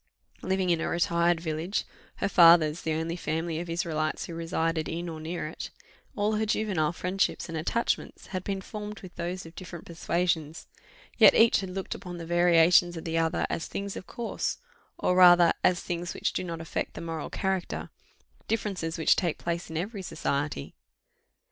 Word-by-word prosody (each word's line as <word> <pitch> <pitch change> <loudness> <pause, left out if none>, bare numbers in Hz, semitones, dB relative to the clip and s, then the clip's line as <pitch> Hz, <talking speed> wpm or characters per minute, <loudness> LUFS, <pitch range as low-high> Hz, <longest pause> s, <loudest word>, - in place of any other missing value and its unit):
Living 190 -1 0
in 165 -1 +1
a - - -1
retired 170 0 +2
village, 165 +4 -2 0.3
her - - -1
father's 165 -4 +6
the 160 - -2
only 160 +2 -2
family 160 -1 -2
of 175 0 -6
Israelites 160 -2 -1
who 170 - -8
resided 165 -1 -1
in 170 +2 -4
or 160 -2 -6
near 160 +1 -4
it, 155 - -7 0.5
all 210 +1 +1
her 220 - +1
juvenile 195 -8 +1
friendships 180 +3 -1
and 165 - -6
attachments 175 +9 -1
had 185 -1 -2
been 195 -1 -3
formed 210 +1 -7
with 185 -2 -11
those 175 +1 -4
of 165 - -11
different 175 -2 -9
persuasions; 165 -2 -1 0.5
yet - - +8
each 230 0 +6
had 190 - -5
looked 190 +1 -4
upon 180 -1 -8
the 165 - -6
variations 175 0 +4
of 165 - -7
the 165 0 0
other 165 0 +1
as 165 - -3
things 200 0 -4
of - - -8
course, 235 -1 -3 0.4
or 180 - +1
rather 175 -2 +7
as 180 -1 +4
things 175 0 -4
which - - -1
do - - -2
not 170 -2 -5
affect 165 - -4
the - - -6
moral 165 -2 -4
character 190 -2 -2 0.6
differences 195 -7 -2
which 160 - +4
take 170 -4 -1
place 170 0 -3
in 160 - -4
every 200 +4 -3
society." 140 - -3
170 Hz, 180 wpm, -28 LUFS, 165-185 Hz, 0.6 s, yet